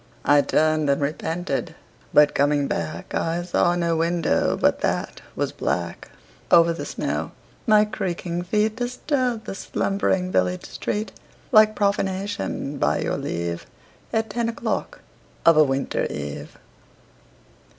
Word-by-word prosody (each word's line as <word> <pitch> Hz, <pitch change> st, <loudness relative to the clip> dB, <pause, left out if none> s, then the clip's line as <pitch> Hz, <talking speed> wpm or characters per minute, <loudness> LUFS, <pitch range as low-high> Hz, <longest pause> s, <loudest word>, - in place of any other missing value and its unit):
I 145 Hz, +1 st, +6 dB
turned 155 Hz, 0 st, +2 dB
and 140 Hz, -, +2 dB
repented, 160 Hz, +1 st, -2 dB, 0.4 s
but 150 Hz, 0 st, +5 dB
coming 145 Hz, 0 st, +2 dB
back 80 Hz, -2 st, -4 dB
I 170 Hz, +1 st, -1 dB
saw 175 Hz, 0 st, +2 dB
no 170 Hz, -1 st, +1 dB
window 165 Hz, 0 st, +1 dB
but -, -, +2 dB
that -, -, -2 dB
was -, -, -1 dB
black. -, -, -3 dB, 0.4 s
Over 170 Hz, 0 st, +6 dB
the 165 Hz, -, -6 dB
snow -, -, -3 dB, 0.3 s
my 215 Hz, -1 st, +6 dB
creaking 175 Hz, -4 st, -3 dB
feet 210 Hz, +4 st, 0 dB
Disturbed 250 Hz, -1 st, -1 dB
the -, -, -5 dB
slumbering 190 Hz, -1 st, -1 dB
village 90 Hz, -, 0 dB
street 210 Hz, +1 st, -3 dB, 0.4 s
Like 215 Hz, -2 st, +6 dB
profanation, 195 Hz, -7 st, -1 dB
by -, -, +1 dB
your -, -, -1 dB
leave, 85 Hz, 0 st, -3 dB, 0.4 s
At 220 Hz, 0 st, -1 dB
ten 235 Hz, -1 st, -1 dB
o'clock 230 Hz, -, -3 dB, 0.4 s
of 165 Hz, -, +7 dB
a 155 Hz, -, +7 dB
winter 135 Hz, -1 st, -1 dB
eve. 75 Hz, -1 st, -6 dB
175 Hz, 130 wpm, -23 LUFS, 145-210 Hz, 0.4 s, of